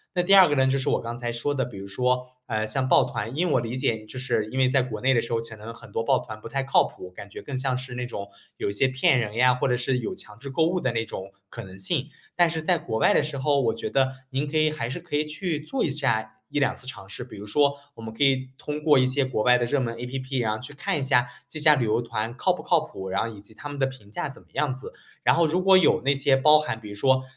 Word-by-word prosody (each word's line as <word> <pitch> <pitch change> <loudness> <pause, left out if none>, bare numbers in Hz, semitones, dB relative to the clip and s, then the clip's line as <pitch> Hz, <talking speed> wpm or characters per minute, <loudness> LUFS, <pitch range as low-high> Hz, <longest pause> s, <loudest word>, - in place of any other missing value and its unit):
那 180 - +3
第 195 +3 +5
二 190 -2 +9
个 145 - +1
呢， 130 -1 +4
就 135 +1 +2
是 135 - -1
我 - - +1
刚 115 +1 -5
才 120 -1 -3
说 130 +5 -2
的， 130 -2 0
比 120 - -10
如 100 0 -7
说， 125 +5 0 0.2
呃， 110 -2 -1
像 130 +4 -1
报 - - +6
团 110 +5 -4
因 175 +4 +1
为 160 - +1
我 - - +4
理 115 +1 -4
解 115 -5 -1
就 120 +4 -8
是 125 -4 0
因 130 - -2
为 130 -1 +4
在 130 -1 +3
国 110 -4 -6
内 135 - +3
的 120 -3 +3
时 115 - -4
候 115 - +2
可 115 -1 -8
能 110 +2 -9
很 - - -13
多 115 - -1
报 130 +2 +3
团 110 -2 -9
不 110 - -9
太 135 +4 -1
靠 135 - +4
谱， 90 - -9
感 100 +2 -10
觉 - - -8
更 140 -2 -5
像 130 -1 0
是 130 -1 -5
那 125 0 -3
种 100 -4 -6 0.3
有 - - -2 0.2
骗 130 0 +4
人 105 -3 -2
呀， 125 +2 +4
或 125 - 0
者 125 - +2
是 125 +1 0
有 120 - -3
强 105 +1 -12
制 140 +2 -8
购 160 +4 +2
物 180 +2 0
的 130 -7 0
那 115 -1 -1
种 95 -3 -7 0.2
可 115 - -8
能 95 -1 -12
性。 140 - -1 0.3
但 175 -1 +5
是 160 -1 -3
在 175 +2 +2
国 110 -7 -3
外 - - +5
的 - - +4
时 145 -2 -4
候， 140 +1 +2
我 115 -3 +1
觉 115 - -4
得 135 -1 +2 0.2
您 135 +2 -1
可 145 - -6
以 155 0 +4
还 125 -7 -3
是 130 +8 -5
可 170 -3 -5
以 150 +1 +1
去 155 +1 -3
做 240 - -2
一 - - +1
下 110 -7 -1
1、2 140 +1 0
次 - - -8
尝 130 -7 -8
试， 105 - -6
比 125 -3 -12
如 105 +1 -9
说 140 +5 +2 0.2
我 - - -11
们 110 0 -7
可 125 - 0
以 130 -1 +2
通 150 0 -5
过 150 -4 +5
一 130 - +3
些 135 +1 +1
国 130 -4 -1
外 125 +2 +5
的 120 - 0
热 135 +4 +1
门 115 -3 -2
app， 130 +2 -4
然 110 -2 0
后 - - -7
去 135 +3 -10
看 150 +1 -1
一 - - -4
下 125 -2 +3 0.2
这 155 - -7
家 150 0 +7
旅 130 -5 +1
游 110 +1 +1
团 115 +1 -4
靠 185 - +2
不 - - -6
靠 170 - +3
谱。 95 -10 -7
然 - - 0
后 115 -1 -5
以 100 - -12
及 105 +2 -14
他 145 - -8
们 145 -1 -7
的 135 - +3
评 120 -6 -12
价 145 - -3
怎 135 - -10
么 - - -31
样 145 -3 0
子， 130 - -8 0.3
然 - - +4
后 170 -1 +3
如 180 +4 0
果 190 0 +7
有 155 -4 +4
那 140 - +4
些 140 0 +3
包 150 +3 +6
含 155 -7 -3
比 105 -2 -10
如 105 - -7
说 130 +4 +3
130 Hz, 335 characters per minute, -25 LUFS, 115-145 Hz, 0.3 s, 二